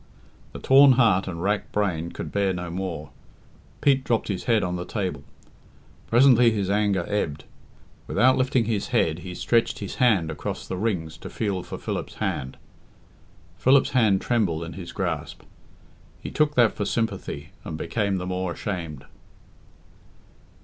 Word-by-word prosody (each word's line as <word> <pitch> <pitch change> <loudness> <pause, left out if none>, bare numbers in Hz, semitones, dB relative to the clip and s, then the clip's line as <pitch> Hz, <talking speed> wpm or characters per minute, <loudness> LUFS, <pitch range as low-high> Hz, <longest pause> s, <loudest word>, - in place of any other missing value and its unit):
The - - -8
torn 135 0 +6
heart 110 -7 +3
and 85 -2 -5
racked 105 +1 -1
brain 85 -5 -1
could - - -6
bear 100 -2 +1
no 90 -1 -5
more. 85 -4 -5 0.7
Pete 135 -2 +3
dropped 115 -4 0
his 95 -3 -3
head 115 -4 +3
on 90 0 -2
the 90 - -3
table. 90 -7 -4 0.8
Presently 125 0 +6
his 100 -3 -1
anger 100 -4 +1
ebbed. 80 -8 -2 0.6
Without 130 +1 +4
lifting 130 -2 +1
his 105 -2 -1
head, 80 +1 +1
he 90 0 -8
stretched 115 +4 +1
his 100 - -6
hand 95 -10 +3
across 75 - -5
the - - -3
rings 90 -6 -2
to - - -8
feel 100 -4 -2
for - - -7
Philip's - - -5
hand. 65 0 -3 1.0
Philip's 135 +2 +4
hand 110 -7 +3
trembled 95 -10 0
in 85 - -7
his 85 -3 -8
grasp. - - -4 0.8
He - - -7
took 150 -1 +1
that 120 -3 +4
for 105 - -3
sympathy, 115 +2 -3
and 80 - -5
became 100 +4 -1
the 90 - -4
more 90 -1 -2
ashamed. 85 -8 -5
100 Hz, 155 wpm, -25 LUFS, 85-115 Hz, 1.0 s, torn